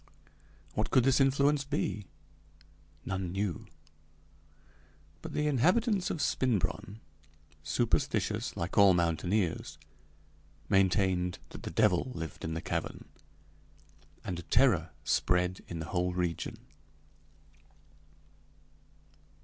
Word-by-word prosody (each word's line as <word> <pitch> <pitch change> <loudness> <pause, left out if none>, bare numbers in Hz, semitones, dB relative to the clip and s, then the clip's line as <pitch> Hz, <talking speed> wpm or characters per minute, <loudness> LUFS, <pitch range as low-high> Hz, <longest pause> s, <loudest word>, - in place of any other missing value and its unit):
What - - -1
could 130 - +4
this 135 +2 +4
influence 140 +1 +3
be? 140 -8 -2 1.0
None 95 -2 -3
knew. 95 -3 -3 1.5
But - - -7
the 150 - 0
inhabitants 180 - +2
of 155 - -2
Spinbronn, 110 -3 -1 0.6
superstitious - - 0
like 85 +4 -1
all 100 -2 +7
mountaineers, 85 +2 0 0.9
maintained 95 -2 +2
that - - -10
the - - -5
devil 90 +8 +2
lived 80 -1 -6
in 80 0 -3
the 80 - -3
cavern, - - -4 1.1
and 90 -1 -4
terror 100 - +4
spread 90 +1 +1
in 85 - -5
the 80 - -4
whole 90 0 0
region. 90 -2 -2
95 Hz, 95 wpm, -31 LUFS, 90-130 Hz, 1.5 s, all